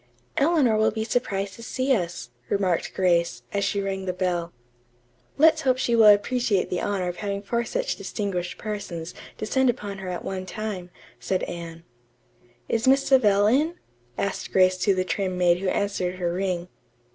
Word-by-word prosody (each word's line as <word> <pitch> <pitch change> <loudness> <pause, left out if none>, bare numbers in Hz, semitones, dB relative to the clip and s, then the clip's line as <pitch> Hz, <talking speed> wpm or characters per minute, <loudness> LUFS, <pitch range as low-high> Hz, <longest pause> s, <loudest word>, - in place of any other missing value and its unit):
"Eleanor 285 -7 +3
will 215 0 +4
be 220 +1 -3
surprised 200 -4 -1
to 230 - -12
see 260 +3 0
us," 170 - -4 0.2
remarked 190 -4 0
Grace, 170 -9 +1
as 200 - 0
she 200 0 0
rang 195 -1 -3
the 180 - -1
bell. 175 -2 -1 0.9
"Let's 315 +1 +5
hope 255 -3 +2
she 240 -2 +1
will 225 -2 +7
appreciate 205 -2 +3
the 180 - -1
honor 195 -3 -1
of 175 - -4
having 200 -1 -3
four 235 +3 -1
such - - -2
distinguished 180 -4 -3
persons 190 -6 -5 0.2
descend 260 +4 +1
upon 205 -5 -3
her 190 -1 -5
at 180 - -5
one 185 -1 -4
time," 200 -4 -5 0.3
said 185 - -1
Anne. 170 -1 -6 0.8
"Is 230 +2 0
Miss 270 +1 +5
Savell 210 -7 +4
in?" 295 +10 +2 0.4
asked 200 - -3
Grace 185 -1 +4
to 195 +1 +2
the 185 0 0
trim 185 -1 -2
maid 175 -1 +3
who 190 0 -1
answered 190 -3 -1
her 175 -2 -2
ring. 180 -2 -2
200 Hz, 170 wpm, -25 LUFS, 180-225 Hz, 0.9 s, will